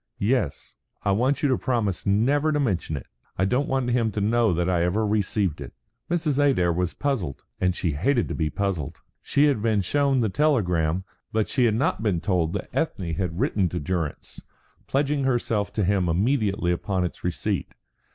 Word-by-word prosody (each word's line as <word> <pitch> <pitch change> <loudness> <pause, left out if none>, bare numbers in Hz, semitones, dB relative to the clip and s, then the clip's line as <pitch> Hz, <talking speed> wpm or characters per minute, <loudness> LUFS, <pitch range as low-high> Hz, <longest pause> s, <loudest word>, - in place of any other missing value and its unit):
"Yes. 100 - -1 0.3
I 100 - +2
want 125 +9 +1
you 145 - +3
to 130 - +2
promise 110 -7 -1
never 140 +10 +2
to 150 - +1
mention 95 - -1
it. 65 - -8 0.3
I 95 - +2
don't 125 +7 +1
want 130 -2 0
him 115 -2 +1
to 105 - -2
know 110 +1 +2
that 85 0 0
I 90 -2 +2
ever 95 +6 +1
received 100 -6 0
it." 65 - -8 0.4
Mrs. 160 -5 0
Adair 130 -12 +3
was 90 0 -1
puzzled, 110 - -2 0.2
and 90 -1 +1
she 85 - -1
hated 120 - +1
to - - -4
be 80 -2 -1
puzzled. 95 -5 -3 0.2
She 145 +1 +2
had 140 -8 +2
been 110 -2 +2
shown 140 +6 +2
the 110 - +1
telegram, 95 - +1 0.3
but 110 -1 +1
she 125 -3 +2
had 110 -2 +2
not 115 -2 0
been 100 -6 +1
told 85 -3 0
that 100 - -5
Ethne 95 - -1
had 90 0 -3
written 95 -4 +1
to 90 - -3
Durrance, 80 -1 -4 0.5
pledging 140 0 0
herself 115 -5 0
to 105 - 0
him 95 -2 +1
immediately 100 -1 +1
upon 90 +1 -1
its 90 - -6
receipt. 90 -2 -2
105 Hz, 190 wpm, -25 LUFS, 90-130 Hz, 0.5 s, you